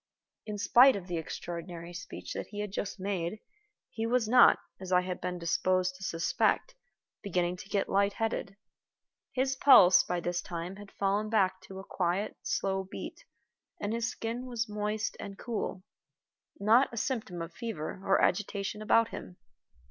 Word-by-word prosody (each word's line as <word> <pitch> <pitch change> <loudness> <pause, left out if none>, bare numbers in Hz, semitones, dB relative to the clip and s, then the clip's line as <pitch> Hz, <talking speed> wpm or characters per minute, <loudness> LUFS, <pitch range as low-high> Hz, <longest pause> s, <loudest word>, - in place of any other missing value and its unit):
In 210 -1 -4
spite 245 +6 +6
of 195 -3 -5
the 175 -2 -3
extraordinary 170 +1 -6
speech 175 +2 -7
that - - -5
he 205 -1 -5
had 210 -2 -4
just 200 0 -4
made, 190 0 -2 0.5
he 225 0 -2
was 240 -2 +2
not, 245 +2 +7 0.2
as 185 -1 -7
I 180 0 +5
had 180 0 -5
been 180 0 -3
disposed 185 +2 +1
to 190 - -11
suspect, 170 - +1 0.5
beginning 180 -2 -1
to 190 - -11
get 200 -2 0
light 200 +1 +2
headed. 220 -3 -3 0.7
His 265 +1 0
pulse, 200 -10 +8
by 180 - -2
this 175 +1 -2
time, 175 +2 -6
had 205 -1 -11
fallen 200 +2 0
back 190 -4 +2
to 190 - -10
a 190 - -7
quiet, 185 +2 -1
slow 195 0 -1
beat, 190 - -8 0.5
and 205 +2 -2
his 235 +1 -1
skin 240 +2 -4
was 240 -2 -2
moist 210 +1 -2
and 200 -1 -7
cool. 215 -5 -4 0.8
Not 225 +7 +5
a 235 - -8
symptom 220 -7 -2
of 165 0 -6
fever 195 -6 -5
or 195 - +3
agitation 205 +1 0
about 230 +1 +4
him. 90 -1 -8
195 Hz, 165 wpm, -30 LUFS, 180-220 Hz, 0.8 s, pulse